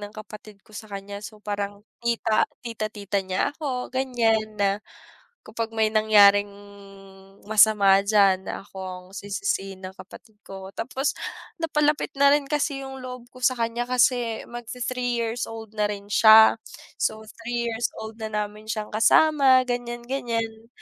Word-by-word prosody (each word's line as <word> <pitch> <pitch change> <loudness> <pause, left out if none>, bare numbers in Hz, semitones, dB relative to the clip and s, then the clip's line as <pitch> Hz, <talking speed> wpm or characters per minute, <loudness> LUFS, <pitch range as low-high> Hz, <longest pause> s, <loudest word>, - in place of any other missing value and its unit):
ng 205 0 -8
kapatid 215 -1 -11
ko - - -21
sa 215 - -9
kanya, 200 0 -7
so 215 - -9
parang 205 0 -4 0.2
tita 235 -2 +2 0.2
tita-tita 215 -3 -3
niya 185 0 0
ako 265 -5 -4
ganiyan, 225 -5 0
na 200 -1 +2 0.8
kapag 225 +1 -4
may 220 -1 +2
nangyaring 205 -2 +5 1.0
masama 210 -2 +5
diyan 200 -2 +3
na - - -5
ako 195 - -19
ang 180 -1 -7
sisisihin 195 - -3
ng 185 0 -7
kapatid 220 +1 -14
ko. 190 -1 -9
Tapos, 265 +5 -2 0.4
napalapit 300 -2 0
na 280 0 +6
rin 295 -1 +1
kasi 285 -2 -1
'yung 265 0 -8
loob 250 -1 -8
ko 255 - -14
sa 255 - +4
kanya 230 +1 -1
kasi 245 -2 +1
mag-ti-three 245 +1 -3
years 230 +1 -2
old 225 -1 -9
na 210 -1 +1
rin 200 -1 -7
siya, 220 +1 +8 0.4
so 220 - -1 0.2
3 240 0 -2
years 225 0 -1
old 220 0 -8
na 220 - -3
namin 210 0 -4
siyang 215 -1 -3
kasama 265 +3 +5
ganiyan-ganiyan, 240 -2 -3
220 Hz, 145 wpm, -24 LUFS, 205-245 Hz, 1.0 s, siya